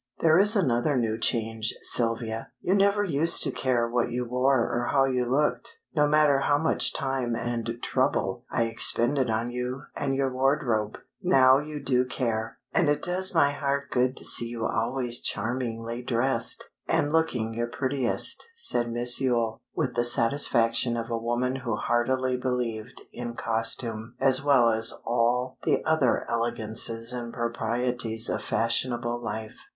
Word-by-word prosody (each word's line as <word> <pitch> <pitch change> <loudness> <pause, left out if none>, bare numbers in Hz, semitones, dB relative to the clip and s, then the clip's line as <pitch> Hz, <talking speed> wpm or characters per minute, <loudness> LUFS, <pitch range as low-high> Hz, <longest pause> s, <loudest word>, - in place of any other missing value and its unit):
"There 160 +1 +4
is 210 +3 +4
another 135 - +1
new 115 -2 -1
change, 115 -2 0
Sylvia. 115 -1 -2
You 185 - 0
never 200 +1 +3
used 165 -3 +3
to - - +1
care 120 -3 0
what 120 0 0
you 125 +1 -2
wore 125 +1 +2
or 120 0 -2
how 135 -1 +3
you 125 -2 0
looked, 140 +5 -1 0.2
no 150 -1 +3
matter 150 -2 +4
how 145 +1 +2
much 160 +2 +2
time 130 -3 -2
and 115 -1 -3
trouble - - -1
I 115 - 0
expended 120 +3 +2
on 115 +2 -1
you 125 +2 -4
and 135 -2 -2
your 135 -1 -1
wardrobe. 130 -5 0 0.2
Now 135 -7 +5
you 150 0 -6
do 130 -2 +1
care, 115 -3 -3 0.2
and 170 -6 +2
it 145 - 0
does 185 +1 +2
my 145 -3 +4
heart 140 0 -2
good 125 +1 +1
to - - -6
see 120 - +2
you 115 -1 -4
always 120 +1 -1
charmingly 115 +1 -3
dressed, 120 -1 -1 0.2
and 145 +1 0
looking 125 -9 0
your 120 +1 -2
prettiest," 135 - 0
said 120 - 0
Miss 120 +2 +2
Yule, 120 -4 0
with - - -1
the 120 - +1
satisfaction 120 -1 +2
of 115 0 -5
a 115 - 0
woman 120 +3 -1
who 120 -4 -3
heartily 125 +3 0
believed 125 -4 -3
in 120 -1 -6
costume 115 0 -2
as 135 0 +3
well 135 -5 +4
as 110 0 +4
all 125 +2 0
the - - 0
other 155 -6 +1
elegances 115 0 -1
and 120 -1 -5
proprieties 115 -1 -2
of - - -2
fashionable 120 +1 0
life. 110 -1 -6
120 Hz, 155 wpm, -26 LUFS, 115-135 Hz, 0.2 s, Now